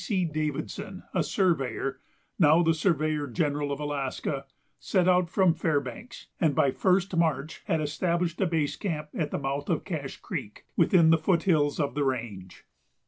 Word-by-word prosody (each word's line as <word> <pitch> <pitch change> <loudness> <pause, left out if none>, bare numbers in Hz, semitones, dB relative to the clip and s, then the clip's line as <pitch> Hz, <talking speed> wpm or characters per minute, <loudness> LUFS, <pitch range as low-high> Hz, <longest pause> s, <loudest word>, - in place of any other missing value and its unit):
C. 190 -4 0
Davidson, 155 +4 -4
a 185 - +2
surveyor, 135 - 0 0.4
now 160 +1 +6
the 165 0 +3
surveyor 155 -3 0
general 145 0 -1
of 140 - -3
Alaska, 140 -1 -3 0.3
set 185 -3 +1
out 180 -1 +3
from 185 -1 +3
Fairbanks, 155 - -3
and 155 -5 +2
by 135 - +3
1st 185 +4 +1
March 160 -2 0
had 165 -6 +1
established 170 +3 -1
a 190 - +3
base 160 -4 0
camp 155 -6 -4
at 155 -3 -2
the - - -2
mouth 140 +1 -3
of - - 0
Cache - - -5
Creek, - - -7
within 170 -5 +5
the 165 - +4
foot 170 +1 +1
hills 150 -6 +2
of 140 -4 0
the 145 +1 0
range. 115 -9 -4
155 Hz, 165 wpm, -27 LUFS, 145-175 Hz, 0.4 s, now